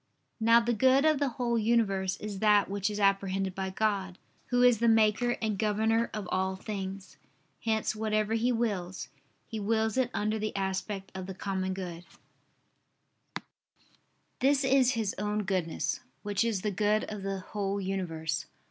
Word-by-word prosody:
Now 230 +1 +6
the 235 +1 0
good 260 +5 +4
of 310 -3 +4
the 285 -2 +1
whole 235 -2 +1
universe 205 -4 +1
is 210 -2 -6
that 210 -1 +4
which 200 +1 -1
is 210 0 -4
apprehended 195 -1 +1
by 190 0 -3
God, 190 -2 -1 0.3
Who 245 -1 +2
is 245 -3 +5
the 235 - +2
Maker 225 +2 +3
and 215 -3 -1
Governor 220 +2 +1
of 210 -4 -5
all 190 0 0
things: 195 -1 -6 0.5
hence 220 -1 0
whatever 215 0 0
He 230 +2 +2
wills, 200 -6 -2 0.4
He 225 - -5
wills 220 +2 0
it 255 -2 +2
under 215 +1 -1
the 215 0 -3
aspect 195 0 -3
of 190 -1 -6
the 190 - -6
common 190 -1 -2
good; 175 -2 -6 2.4
this 275 +1 +3
is 265 -1 +4
His 220 -4 -1
own 210 +1 -1
Goodness, 185 -4 -1 0.2
which 205 0 0
is 225 -5 0
the 210 - 0
good 210 +2 +1
of 210 -1 -6
the 195 0 -3
whole 200 -1 -1
universe. 165 -6 -3
210 Hz, 160 wpm, -29 LUFS, 190-225 Hz, 2.4 s, Now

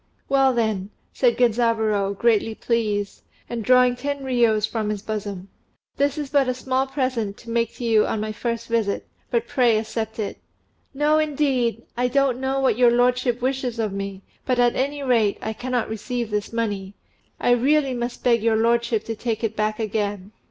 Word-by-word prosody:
"Well, 270 -1 +4
then," 220 -5 -1 0.2
said - - +2
Genzaburô, 220 -4 +1
greatly 225 -1 +2
pleased, 210 -4 -1 0.3
and 235 -2 -4
drawing 250 +1 +5
ten 280 +2 -4
riyos 235 -5 +2
from 220 -2 -2
his 210 -1 -3
bosom, 200 -3 -5 0.5
"this 285 +1 +1
is 290 -3 -4
but 280 -3 +3
a 255 - 0
small 260 +1 -1
present 255 -7 -2
to 230 - -10
make 230 -1 0
to - - -8
you 220 -2 +4
on 220 - -1
my 215 +1 -3
first 230 +1 -3
visit, 225 -4 0 0.2
but 235 -1 0
pray 240 -4 +3
accept 220 0 -3
it." 215 -3 -4 0.5
"No, 295 +2 +2
indeed! 270 -7 0
I 245 +1 +1
don't 265 -1 +1
know 265 +1 0
what 260 -4 +1
your 245 -1 +7
lordship 245 0 +2
wishes 260 -2 -1
of 215 -3 -1
me; 195 -1 -5 0.2
but, 255 - 0
at 245 -1 +3
any 285 +2 -1
rate, 230 -6 +2
I 220 - -4
cannot 245 +1 -2
receive 230 +1 -4
this 210 -1 -2
money. 205 -4 -3 0.4
I - - +2
really 270 +3 +3
must 240 0 -4
beg 235 -2 +3
your 225 0 +2
lordship 235 0 +1
to 225 - -4
take 225 0 -3
it 220 -1 -1
back 215 0 0
again." 205 -2 -2
235 Hz, 180 wpm, -23 LUFS, 215-255 Hz, 0.5 s, your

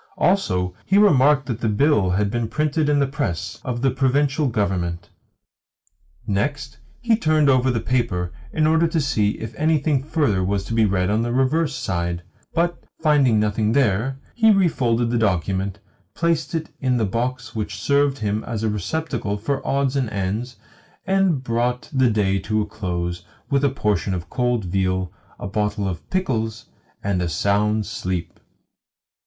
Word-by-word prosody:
Also, 90 - +1
he 195 - +2
remarked 145 -8 +5
that 120 -3 -4
the 110 - +1
bill 105 -3 +3
had 100 +2 +1
been 120 -1 -1
printed 150 +4 0
in 145 - +3
the 140 - +3
press 135 - -3
of 120 0 -3
the 135 - +3
Provincial 140 +3 +1
Government. 90 -6 -2 1.1
Next, 130 +7 -2 0.2
he 230 -2 +3
turned 155 -8 +3
over 130 0 +3
the 120 -2 +1
paper, 110 -8 -1 0.2
in 155 - +1
order 160 +2 +3
to 165 0 0
see 110 -8 +1
if 110 0 -6
anything 155 -3 +2
further 140 - 0
was 95 +1 0
to 115 - -4
be 115 -1 +4
read 95 -1 +1
on 110 +2 +2
the 120 +1 -1
reverse 135 +6 +1
side; 85 -6 -2 0.3
but, 170 +1 -1 0.2
finding 145 -8 +3
nothing 105 +1 +1
there, 130 0 +1 0.2
he 225 -2 +4
refolded 125 - +2
the 120 - +1
document, 95 -1 0 0.4
placed 165 -2 0
it 160 -1 -3
in 130 -2 +1
the 110 - +1
box 125 +6 -3
which 105 -2 -4
served 140 +5 +2
him 105 -2 -2
as 110 -2 -4
a 110 - +1
receptacle 105 - -2
for 135 +7 -2
odds 140 -1 +1
and 130 -4 0
ends, 105 +5 -3 0.5
and 190 -8 +2
brought 125 +1 -1
the 130 -2 +3
day 100 -3 +1
to 110 +3 -1
a 105 - 0
close 90 -4 -4 0.3
with 140 0 +2
a 140 - +4
portion 105 -7 0
of 85 -1 -7
cold 125 -5 0
veal, 95 0 -1 0.2
a - - -7
bottle 105 0 -1
of 90 -3 -6
pickles, 115 - -2 0.4
and 95 -2 0
a 85 - -1
sound 105 +5 +1
sleep. 95 -5 -4
115 Hz, 165 wpm, -22 LUFS, 100-140 Hz, 1.1 s, remarked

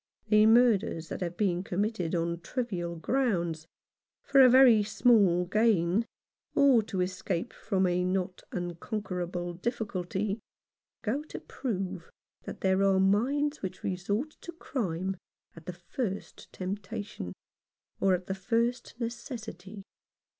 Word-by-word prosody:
The 215 0 +6
murders 220 -8 +3
that - - -5
have 175 -1 -3
been 180 -4 +1
committed 190 -2 -1
on 170 0 -1
trivial 175 -6 -3
grounds, 170 -6 -1 0.6
for 275 -1 +5
a 255 - +9
very 250 -3 +7
small 205 -5 +4
gain, 210 0 +2 0.5
or 270 -5 +6
to 200 -3 -3
escape 180 +2 -2
from 190 -3 0
a 180 0 +1
not 185 0 -1
unconquerable 175 -1 -4
difficulty, 200 0 -2 0.6
go 235 +7 0
to - - -7
prove 190 -8 -4 0.4
that - - -7
there 190 0 +2
are 195 -1 +4
minds 270 +10 +2
which 190 - -6
resort 200 +10 -2
to 345 - -7
crime 190 - -3 0.4
at 165 -1 -14
the 180 - -4 0.2
first 205 -7 -4
temptation, 200 - -5 0.7
or 190 -1 +4
at 180 0 -6
the 190 - -2
first 230 +5 -1
necessity. 225 -5 -6
195 Hz, 125 wpm, -29 LUFS, 180-230 Hz, 0.7 s, a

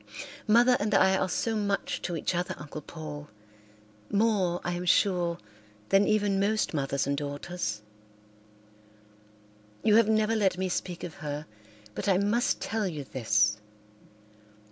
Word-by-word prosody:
Mother 240 +3 +5
and 210 0 0
I 190 0 +5
are 190 0 0
so 225 +4 -1
much 200 -2 -1
to 175 - -3
each 160 - -1
other, 175 +1 -2
Uncle 150 +1 -8
Paul, 150 -2 -8 0.8
more, 200 -5 +2
I 175 - -2
am 175 +1 -4
sure, 175 -2 +2 0.5
than 195 +1 +4
even 205 -2 +2
most 210 0 +1
mothers 140 -2 -1
and 140 +1 0
daughters. 145 -6 -4 2.0
You 215 0 +5
have 230 -2 +5
never 215 +1 +2
let 195 -4 +2
me 185 0 -1
speak 175 0 -3
of 175 - -5
her, 150 0 -4 0.5
but - - -2
I 185 - +4
must 210 +5 +1
tell 220 -3 -1
you 155 -5 -5
this. 105 -5 +1
180 Hz, 145 wpm, -28 LUFS, 150-210 Hz, 2.0 s, Mother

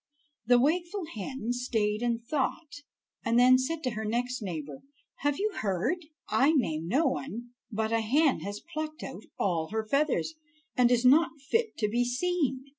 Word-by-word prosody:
The 245 0 +6
wakeful 345 +7 0
hen 230 +3 -5
stayed 220 -4 0
and 235 -1 -1
thought, 290 +2 -2 0.4
and 230 +1 +2
then 255 +1 +7
said 315 +5 -2
to 255 - 0
her 220 0 -4
next 245 +3 -1
neighbor: 155 -8 -5 0.4
"Have 290 0 0
you 425 +2 0
heard? 195 - 0 0.3
I 280 +4 +4
name 165 - 0
no 275 - +2
one, 240 -3 -3 0.2
but 220 +1 -1
a 230 0 +2
hen 275 +6 +3
has 205 +1 -6
plucked 310 +1 -4
out - - -7
all 165 -4 0
her 220 +3 -2
feathers, 300 +5 +1 0.4
and 245 -1 +5
is 245 0 +3
not 320 +4 +5
fit 455 -1 +1
to 210 - +1
be 240 +4 +1
seen. 265 0 0
250 Hz, 170 wpm, -29 LUFS, 220-300 Hz, 0.4 s, then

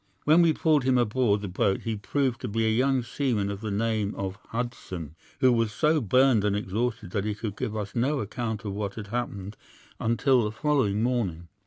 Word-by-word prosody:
When 155 +3 +5
we 165 -1 +5
pulled 155 -2 +2
him 130 0 +3
aboard 115 -3 +2
the 100 - -4
boat 95 +1 0
he 115 -1 -2
proved 125 +3 -1
to 125 - -3
be 115 +1 0
a 110 - +3
young 130 +2 +2
seaman 115 -5 -1
of 100 0 -6
the 110 - -3
name 110 0 -1
of 95 -1 -4
Hudson, 115 - -5 0.3
who 130 -1 +6
was 115 -2 +1
so 150 +8 +2
burned 125 0 +4
and 105 -1 +1
exhausted 110 +1 -2
that 100 0 -1
he 105 -1 -1
could 105 -1 -5
give 115 -3 -3
us 100 -1 -4
no 135 +5 +1
account 110 0 -4
of 100 - -3
what 100 -1 -3
had 105 -2 -7
happened 105 -4 -4 0.4
until 120 +2 +2
the 105 - -1
following 110 -4 +1
morning. 95 -10 -1
110 Hz, 205 wpm, -27 LUFS, 100-125 Hz, 0.4 s, who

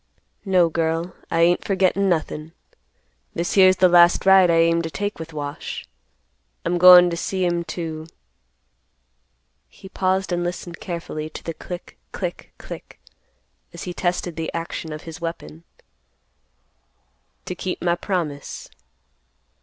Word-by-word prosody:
"No, 185 -3 +4
girl, 165 +2 -2
I 165 - +1
ain't 175 +1 +3
forgettin' 195 0 +1
nothin'. 160 -2 -2 0.8
This 170 +1 -2
here's 185 -1 +6
the 185 - +6
last 175 0 +5
ride 190 -2 +7
I 170 - +4
aim 165 0 +3
to 165 - -4
take 205 +3 -4
with 165 0 -7
Wash. 145 -1 -6 0.8
I'm 175 +1 0
goin' 180 0 +9
to - - -2
see 185 +2 -2
him 175 -1 0
to,"—he 160 -1 -6 1.8
paused 190 0 0
and 175 0 0
listened 175 0 -5
carefully 165 -3 -5
to - - -10
the 165 - -4
click, 175 +2 -9
click, - - -5
click, - - -10 0.7
as - - -8
he 180 - -5
tested 175 -1 -2
the 165 -1 -3
action 165 -1 -5
of 155 0 -7
his 165 +1 -9
weapon—"to 80 - -6 1.9
keep 180 0 -4
my 175 -1 +1
promise." 170 -6 -4
170 Hz, 130 wpm, -22 LUFS, 165-180 Hz, 1.9 s, goin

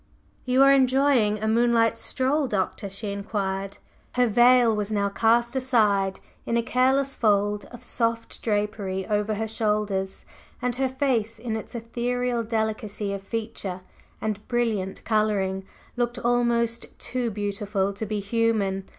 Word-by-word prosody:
"You 255 +1 +4
are 275 0 +7
enjoying 260 -5 +3
a 215 +1 -2
moonlight 230 0 +3
stroll, 270 +4 0
Doctor?" 200 -1 -2
she 200 +1 -3
inquired. 195 -1 -3 0.4
Her 250 0 +3
veil 240 0 +5
was 210 0 -2
now 200 -1 +1
cast 235 +4 +2
aside 210 -7 +2 0.2
in 235 - 0
a 235 - +1
careless 265 +3 +2
fold 205 -2 +1
of 245 - -12
soft 230 -1 -2
drapery 205 -3 -1
over 210 0 0
her 220 +1 -2
shoulders, 210 -3 -1 0.3
and 250 0 -1
her 265 0 +1
face 250 -5 0
in 225 0 -4
its 220 +3 -7
ethereal 240 +1 -1
delicacy 220 -2 -2
of 200 - -4
feature 200 -3 -4 0.4
and 215 -1 -4
brilliant 225 -6 -1
coloring 200 -3 0 0.3
looked 240 0 -1
almost 235 -1 0
too 250 -2 -2
beautiful 200 -1 -2
to 205 +3 -4
be 210 0 -2
human. 200 -2 0
220 Hz, 140 wpm, -25 LUFS, 205-240 Hz, 0.4 s, are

